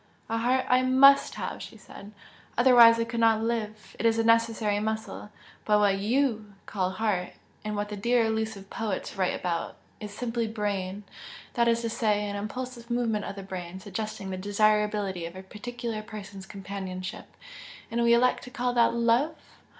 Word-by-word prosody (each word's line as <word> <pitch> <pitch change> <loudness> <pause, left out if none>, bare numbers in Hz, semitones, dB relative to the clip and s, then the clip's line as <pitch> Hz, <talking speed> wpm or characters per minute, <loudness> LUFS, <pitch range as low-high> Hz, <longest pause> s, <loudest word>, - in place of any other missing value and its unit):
"A 225 - 0
heart 255 +3 +1
I 250 0 +4
MUST 270 +2 +5
have!" - - -5
she - - -9
said 200 +1 -12 0.5
"otherwise 240 -2 +7
I - - +2
could 230 0 -4
not 225 -1 +4
live. 215 -2 -3
It - - -2
is 225 0 +2
a 225 - +2
necessary 225 -2 +2
muscle. 220 0 -4 0.3
But 210 -1 +3
what 200 -2 +3
YOU 220 -1 0
call 185 -3 -1
'heart' 190 -4 -1 0.3
and 210 0 -3
what 205 0 -2
the 210 - -4
dear 235 +3 +2
elusive 220 -3 -3
poets 215 -3 -3
write 185 -2 0
about, 170 -2 -3 0.2
is 210 -1 -7
simply 230 +1 -2
brain, 205 -2 -3 0.5
that 235 -1 +2
is 230 0 +2
to 230 - -1
say, 210 -2 0
an 205 - -4
impulsive 235 +3 -6
movement 230 -3 0
of - - -6
the 195 - -7
brain, 185 -1 -7
suggesting 210 -1 -5
the 185 - -4
desirability 205 -2 +1
of 170 - -11
a 190 - -8
particular 225 +2 -6
person's 200 -3 -9
companionship 190 -2 -6 0.6
and 235 +1 0
we 235 0 +5
elect 250 +1 +2
to - - -9
call 250 0 -1
that 235 -1 +3
'love'! 235 +7 +2
215 Hz, 175 wpm, -27 LUFS, 200-235 Hz, 0.6 s, otherwise